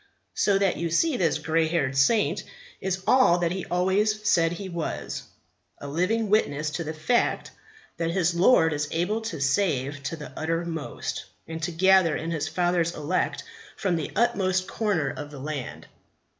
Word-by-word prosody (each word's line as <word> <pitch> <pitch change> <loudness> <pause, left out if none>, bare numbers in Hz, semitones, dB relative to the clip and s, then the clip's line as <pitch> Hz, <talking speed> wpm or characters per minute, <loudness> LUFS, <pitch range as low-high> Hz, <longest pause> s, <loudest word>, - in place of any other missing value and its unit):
So 200 -1 +2
that 195 -2 +1
you 170 0 -2
see 300 - +2
this 165 -9 +1
grey 160 +1 +1
haired 150 -5 0
saint 205 - +2 0.4
is 190 0 -2
all 255 -6 +5
that 170 -1 0
he 185 0 -3
always 205 +4 +1
said 165 -1 +3
he 190 +3 -6
was 170 -3 -4 0.6
a 145 - -8
living 185 +10 0
witness 155 -8 +1
to 165 +2 -3
the 155 - -4
fact 195 +10 0 0.5
that 165 -1 -1
his 170 -1 +1
Lord 170 -3 +4
is 150 0 -1
able 190 +7 -1
to 220 -8 -5
save 140 -2 0
to 145 +4 -4
the 150 -2 -9
uttermost, 165 -1 -3 0.2
and 160 0 -6
to 160 - -2
gather 185 -1 +4
in 165 +1 -4
His 155 -2 -2
Father's 175 -1 0
elect 155 +5 -1 0.3
from 190 -4 0
the 160 -3 -3
utmost 185 -5 +1
corner 195 -11 0
of 145 -1 -7
the 145 - -10
land. 145 -2 -5
170 Hz, 170 wpm, -26 LUFS, 155-190 Hz, 0.6 s, all